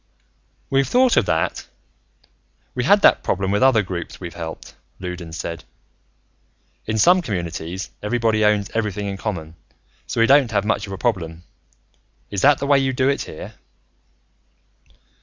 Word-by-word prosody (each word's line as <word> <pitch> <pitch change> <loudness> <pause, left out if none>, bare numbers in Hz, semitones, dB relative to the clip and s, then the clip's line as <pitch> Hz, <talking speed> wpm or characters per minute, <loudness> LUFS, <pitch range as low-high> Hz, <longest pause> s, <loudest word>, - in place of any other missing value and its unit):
"We've 135 -1 +2
thought 250 - +4
of 100 - +3
that. 80 0 -1 1.1
We 125 -1 -2
had 205 +6 +4
that - - +6
problem 95 +1 -1
with 105 - +1
other 130 -5 +5
groups 90 -3 -6
we've 85 -2 -7
helped," 80 -2 -8 0.3
Loudons 90 -3 -6
said. 85 0 -5 1.2
"In 110 0 -1
some 180 - +5
communities, 90 - -4
everybody 110 0 +1
owns 105 -1 +2
everything 105 -2 -2
in 100 -1 -4
common 90 -7 -4
and - - -17 0.5
so - - -3
we 115 - +6
don't 135 -1 +5
have 105 -2 0
much 105 -2 -1
of 95 - -6
a - - -5
problem. 85 -8 -2 0.9
Is 100 -2 -2
that 145 0 +5
the 140 - -3
way 140 -1 +4
you 135 -1 0
do 130 +1 +2
it, 140 - 0
here?" - - -9
105 Hz, 160 wpm, -21 LUFS, 90-130 Hz, 1.2 s, that